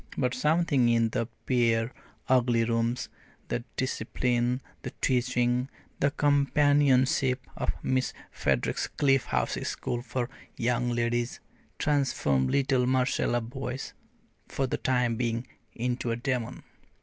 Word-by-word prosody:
But 125 -1 +1
something 150 -3 +2
in 115 -1 +3
the 115 +1 -1 0.2
bare, 115 -2 +2 0.3
ugly 120 -2 +3
rooms, 115 +1 0 0.4
the 120 - -2
discipline, 125 0 0 0.2
the - - -5
teaching, 125 0 +1 0.3
the 140 - +3
companionship 140 -3 +3
of - - -3
Miss 130 0 +1 0.2
Frederick's 65 -3 0
Cliff 135 -2 +2
House - - -1
School 120 - -3
for 120 0 -3 0.3
Young 120 +1 +1
Ladies, 120 0 -1 0.4
transformed 125 - +1
little 130 -2 +2
Marcella 130 -2 +1
Boyce, 130 +2 -5 0.5
for 135 - -1
the 130 - -2
time 125 -3 +1
being, 115 0 -1 0.3
into 125 0 -2
a 115 - +1
demon. 125 -1 -3
125 Hz, 115 wpm, -28 LUFS, 120-130 Hz, 0.5 s, in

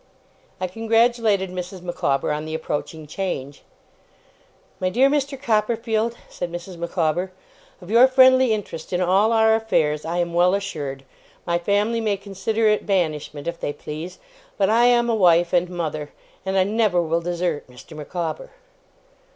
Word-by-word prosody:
I 185 - -1
congratulated 225 -1 +1
Mrs. 180 0 -6
Micawber 150 -6 -1
on 150 +1 -3
the 155 0 -4
approaching 155 0 -4
change. 145 -5 -5 1.2
'My 185 - 0
dear 255 +8 +4
Mr. 280 -2 -1
Copperfield,' 225 -1 0
said 175 -1 -6
Mrs. 175 +2 -7
Micawber, 170 +1 -1 0.5
'of 180 +1 -10
your 240 +3 +7
friendly 260 -1 +5
interest 190 -6 -4
in 180 - +1
all 190 +5 +3
our 220 -1 +4
affairs, 155 -9 +1
I 170 +2 -3
am 175 -1 -1
well 180 +2 +4
assured. 145 -9 -5 0.4
My 170 -1 0
family 205 +5 +1
may 210 -3 0
consider 210 +3 -1
it 210 0 +1
banishment, 155 -6 -1
if 170 0 -4
they 145 - -3
please; 155 +5 -7 0.4
but 200 0 +2
I 235 +2 +4
am 240 -1 +4
a 235 - +1
wife 175 -4 +4
and 175 0 +2
mother, 155 -4 -4 0.4
and 190 0 0
I 190 - +5
never 210 -2 +1
will 165 0 0
desert 175 -2 -2
Mr. 125 +5 -13
Micawber. 170 - -5
185 Hz, 155 wpm, -22 LUFS, 170-220 Hz, 1.2 s, your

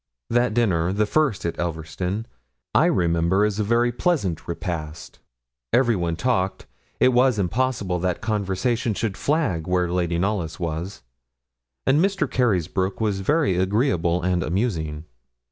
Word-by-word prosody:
That 120 -2 +2
dinner, 90 -8 +2
the 105 +2 +1
first 140 - +1
at 85 - -3
Elverston, 85 +5 -3 0.5
I - - +5
remember 85 +3 +2
as 105 0 -2
a - - +2
very 120 +3 +2
pleasant 120 - -1
repast. 80 -3 -5 0.5
Everyone 100 -10 +2
talked 95 -3 -1 0.3
it 130 - +4
was 125 -1 +4
impossible 100 -2 0
that 90 0 -1
conversation 110 +1 -1
should 105 -3 -2
flag 110 - 0
where 90 -1 +1
Lady 85 -1 0
Knollys 95 -3 -1
was; 85 +2 -4 0.8
and 145 +5 +4
Mr. 195 -4 +1
Carysbroke 95 -5 0
was 105 -3 0
very 145 - +2
agreeable 90 - +1
and 90 -1 +1
amusing. 80 -5 -2
95 Hz, 130 wpm, -23 LUFS, 85-120 Hz, 0.8 s, I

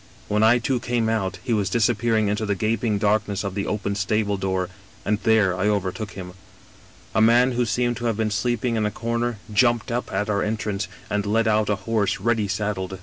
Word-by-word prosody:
When 105 +1 +1
I 110 +2 +6
too 125 +1 0
came 120 -2 0
out 100 -5 -1
he 125 - -1
was 100 -3 +1
disappearing 115 0 +2
into 105 +2 -1
the 100 -1 0
gaping 110 +2 0
darkness 105 0 0
of 100 -2 -3
the 100 0 -3
open 105 -1 -2
stable 105 +1 0
door, 95 -1 -1 0.4
and 105 0 +1
there 110 -5 +3
I 95 +3 0
overtook 105 +1 -2
him. 90 -2 -8 0.4
" - - -26
A 110 - +3
man 120 +3 +5
who 120 -1 0
seemed 120 +1 0
to 120 - -5
have 115 -3 0
been 110 -1 0
sleeping 120 +2 0
in 105 -1 +1
a - - 0
comer 115 +1 -2 0.2
jumped 120 +1 +2
up 120 +1 -2
at 100 +2 -1
our 100 -2 0
entrance, 105 -2 -2 0.2
and 105 -1 -1
led 115 +2 +2
out 110 -1 +2
a 105 - +2
horse 110 -3 0
ready 115 -3 +1
saddled. 95 -1 -3
110 Hz, 210 wpm, -23 LUFS, 100-115 Hz, 0.4 s, I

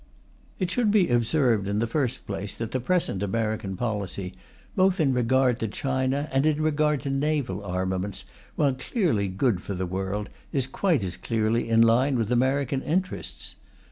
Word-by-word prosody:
It 180 -2 -1
should 235 -1 +2
be 205 -4 +4
observed, 120 -3 +2
in 100 +1 -1
the 115 - +1
first 125 0 -1
place, 100 0 -5
that 115 -1 -4
the 130 - 0
present 145 - 0
American 105 -1 -2
policy, 100 -5 -3 0.4
both 190 -1 +3
in 140 -4 +3
regard 125 0 +2
to 115 - -1
China 130 +5 -1
and 135 +1 +2
in 155 -1 +1
regard 150 -1 +1
to 140 - -3
naval 135 -8 -1
armaments, 95 +1 -2 0.3
while 140 -3 +2
clearly 130 - 0
good 95 +1 0
for 100 - -5
the 95 +1 -2
world, 95 +3 -3 0.2
is 135 -3 +1
quite 150 - +1
as 90 -2 -3
clearly 115 +1 0
in 115 0 +5
line 125 +4 +3
with 115 -1 -1
American 135 +2 +1
interests. 185 +6 -3
120 Hz, 170 wpm, -26 LUFS, 100-145 Hz, 0.4 s, in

